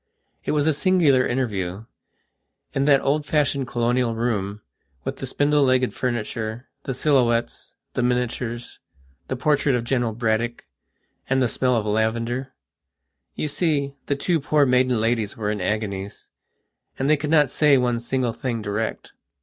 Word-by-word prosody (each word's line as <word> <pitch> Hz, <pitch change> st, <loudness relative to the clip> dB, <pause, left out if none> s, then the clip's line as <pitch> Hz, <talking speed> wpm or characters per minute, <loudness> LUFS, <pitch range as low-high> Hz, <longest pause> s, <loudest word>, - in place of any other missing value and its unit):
It -, -, 0 dB
was 145 Hz, -1 st, +2 dB
a 160 Hz, -, +3 dB
singular 150 Hz, -5 st, +3 dB
interview, 105 Hz, -6 st, -2 dB, 0.9 s
in 135 Hz, -, +1 dB
that 140 Hz, -2 st, +5 dB
old 145 Hz, +2 st, +1 dB
fashioned 145 Hz, -3 st, 0 dB
colonial 120 Hz, 0 st, 0 dB
room, 105 Hz, -3 st, -2 dB, 0.4 s
with -, -, -4 dB
the -, -, -5 dB
spindle 145 Hz, +1 st, +2 dB
legged 130 Hz, -2 st, +3 dB
furniture, 115 Hz, -1 st, -3 dB, 0.2 s
the 135 Hz, -, -2 dB
silhouettes, 125 Hz, -5 st, +1 dB, 0.2 s
the -, -, 0 dB
miniatures, 120 Hz, -1 st, -2 dB, 0.5 s
the -, -, -2 dB
portrait 140 Hz, 0 st, +2 dB
of 120 Hz, -, -1 dB
General 120 Hz, -2 st, 0 dB
Braddock, 115 Hz, +1 st, -1 dB, 0.6 s
and 135 Hz, 0 st, +2 dB
the 125 Hz, -, +3 dB
smell 125 Hz, +3 st, +1 dB
of 110 Hz, -2 st, 0 dB
lavender. 115 Hz, +4 st, -1 dB, 0.8 s
You -, -, -2 dB
see, 145 Hz, -3 st, 0 dB
the 140 Hz, -, +1 dB
two 165 Hz, +4 st, 0 dB
poor 145 Hz, 0 st, +3 dB
maiden 125 Hz, -2 st, +3 dB
ladies 115 Hz, -2 st, 0 dB
were 105 Hz, -2 st, -1 dB
in 105 Hz, -, -3 dB
agoniesand 100 Hz, 0 st, -3 dB, 0.7 s
they 140 Hz, +3 st, +3 dB
could 150 Hz, 0 st, -4 dB
not 150 Hz, -4 st, +4 dB
say 145 Hz, -2 st, +4 dB
one 125 Hz, -2 st, +1 dB
single 120 Hz, 0 st, -1 dB
thing 115 Hz, -3 st, -3 dB
direct. 105 Hz, +2 st, -3 dB
125 Hz, 150 wpm, -23 LUFS, 115-140 Hz, 0.9 s, that